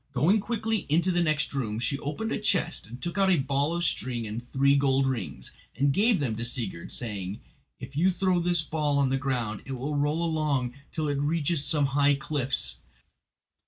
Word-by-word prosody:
Going 160 Hz, -, +3 dB
quickly 220 Hz, -1 st, -2 dB
into 170 Hz, +5 st, +3 dB
the 175 Hz, 0 st, +2 dB
next 155 Hz, -3 st, 0 dB
room 110 Hz, -6 st, -2 dB
she 125 Hz, +4 st, -1 dB
opened 150 Hz, +12 st, -3 dB
a -, -, -1 dB
chest 195 Hz, -, 0 dB
and 120 Hz, +3 st, -9 dB
took 175 Hz, +8 st, -3 dB
out 195 Hz, -1 st, +4 dB
a 180 Hz, -, +5 dB
ball 140 Hz, +3 st, 0 dB
of 175 Hz, -, -1 dB
string 120 Hz, -6 st, -2 dB
and 110 Hz, +2 st, -4 dB
three 135 Hz, +3 st, +2 dB
gold 135 Hz, -1 st, +3 dB
rings, 110 Hz, -, -3 dB, 0.2 s
and 140 Hz, +1 st, +2 dB
gave 210 Hz, -, +3 dB
them 125 Hz, -6 st, -1 dB
to 115 Hz, -, -3 dB
Sigurd, 115 Hz, -8 st, -2 dB
saying: 100 Hz, -4 st, -4 dB, 0.4 s
"If 140 Hz, -, -9 dB
you 175 Hz, +5 st, +4 dB
throw 185 Hz, -1 st, +1 dB
this 175 Hz, -2 st, +1 dB
ball 150 Hz, -2 st, 0 dB
on 140 Hz, -2 st, +3 dB
the 135 Hz, -, +1 dB
ground 125 Hz, -6 st, -2 dB
it 135 Hz, -, -5 dB
will 135 Hz, +4 st, -3 dB
roll 150 Hz, +4 st, +1 dB
along 150 Hz, -6 st, 0 dB, 0.2 s
till 155 Hz, -2 st, -2 dB
it 145 Hz, -1 st, -1 dB
reaches 150 Hz, +1 st, 0 dB
some 150 Hz, -1 st, +2 dB
high 145 Hz, 0 st, +4 dB
cliffs. 130 Hz, -, +1 dB
140 Hz, 195 wpm, -27 LUFS, 130-165 Hz, 0.4 s, a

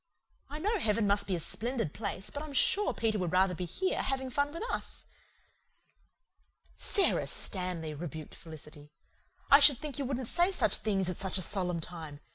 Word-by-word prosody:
I 295 Hz, -, -5 dB
know 415 Hz, +7 st, 0 dB
heaven 215 Hz, -3 st, +1 dB
must 200 Hz, 0 st, +2 dB
be 190 Hz, -, 0 dB
a -, -, -2 dB
splendid 230 Hz, -, -2 dB
place, 200 Hz, -2 st, -3 dB
but 285 Hz, -, -5 dB
I'm 305 Hz, -2 st, -7 dB
sure 400 Hz, +9 st, +4 dB
Peter 220 Hz, -2 st, 0 dB
would 180 Hz, -3 st, -1 dB
rather 185 Hz, 0 st, +3 dB
be 180 Hz, +1 st, -4 dB
here, 370 Hz, -, -1 dB
having 265 Hz, -1 st, -2 dB
fun 285 Hz, +3 st, +1 dB
with 335 Hz, +7 st, -5 dB
us." -, -, -4 dB, 1.7 s
"Sara 395 Hz, -, +2 dB
Stanley," 180 Hz, -5 st, -1 dB
rebuked 155 Hz, 0 st, -7 dB
Felicity. 150 Hz, -2 st, -11 dB, 0.6 s
"I 280 Hz, -, +10 dB
should 285 Hz, -2 st, +8 dB
think 290 Hz, -1 st, -5 dB
you 275 Hz, -, -1 dB
wouldn't 255 Hz, -2 st, -2 dB
say 350 Hz, +7 st, +2 dB
such 380 Hz, -, +2 dB
things 195 Hz, -4 st, 0 dB
at 180 Hz, -, -3 dB
such 190 Hz, 0 st, 0 dB
a 185 Hz, -, 0 dB
solemn 180 Hz, -2 st, -1 dB
time. 160 Hz, -4 st, -8 dB
205 Hz, 180 wpm, -31 LUFS, 175-280 Hz, 1.7 s, I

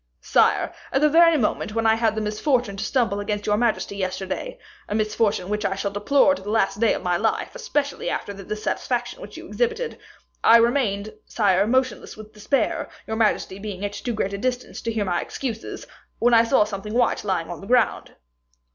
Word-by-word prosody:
"Sire, -, -, +2 dB, 0.2 s
at 270 Hz, -, +2 dB
the 300 Hz, +1 st, +4 dB
very 330 Hz, +1 st, +6 dB
moment 215 Hz, -3 st, -1 dB
when 225 Hz, 0 st, 0 dB
I 220 Hz, -, +6 dB
had 225 Hz, -1 st, +1 dB
the 220 Hz, -, -1 dB
misfortune 215 Hz, +1 st, 0 dB
to 195 Hz, -, -4 dB
stumble 225 Hz, -4 st, 0 dB
against 205 Hz, 0 st, -3 dB
your 210 Hz, -, +2 dB
majesty 220 Hz, -2 st, 0 dB
yesterday 190 Hz, -, -4 dB, 0.3 s
a 205 Hz, -, -1 dB
misfortune 215 Hz, -3 st, 0 dB
which 210 Hz, +1 st, -2 dB
I 195 Hz, -, 0 dB
shall 200 Hz, +1 st, -2 dB
deplore 275 Hz, +8 st, +3 dB
to 280 Hz, -, -6 dB
the 200 Hz, -, -7 dB
last 205 Hz, -2 st, +1 dB
day 230 Hz, -1 st, +3 dB
of -, -, -6 dB
my 180 Hz, -1 st, +1 dB
life, 220 Hz, +4 st, -1 dB
especially 445 Hz, -, -2 dB
after 200 Hz, -, -3 dB
the 195 Hz, 0 st, -10 dB
dissatisfaction 215 Hz, -, -3 dB
which -, -, -10 dB
you -, -, -9 dB
exhibited 475 Hz, 0 st, -2 dB, 0.4 s
I 230 Hz, -, +8 dB
remained, 230 Hz, -4 st, +1 dB
sire, 200 Hz, -2 st, +2 dB
motionless 255 Hz, -1 st, 0 dB
with 215 Hz, 0 st, -12 dB
despair, 215 Hz, +4 st, -1 dB, 0.2 s
your 220 Hz, -, -3 dB
majesty 215 Hz, -3 st, 0 dB
being 200 Hz, -1 st, -5 dB
at 205 Hz, -, -4 dB
too 240 Hz, +3 st, -4 dB
great 200 Hz, -2 st, -2 dB
a 200 Hz, -, -4 dB
distance 250 Hz, +2 st, -3 dB
to 230 Hz, -, -2 dB
hear 220 Hz, -2 st, -1 dB
my 175 Hz, -2 st, 0 dB
excuses, 230 Hz, -5 st, -5 dB, 0.3 s
when 240 Hz, +1 st, +3 dB
I 230 Hz, 0 st, +6 dB
saw 230 Hz, -2 st, +4 dB
something 210 Hz, 0 st, -6 dB
white 245 Hz, -, +2 dB
lying 185 Hz, -5 st, -2 dB
on 175 Hz, -, -7 dB
the 195 Hz, -, -10 dB
ground." 245 Hz, -1 st, +1 dB
215 Hz, 200 wpm, -23 LUFS, 200-245 Hz, 0.4 s, I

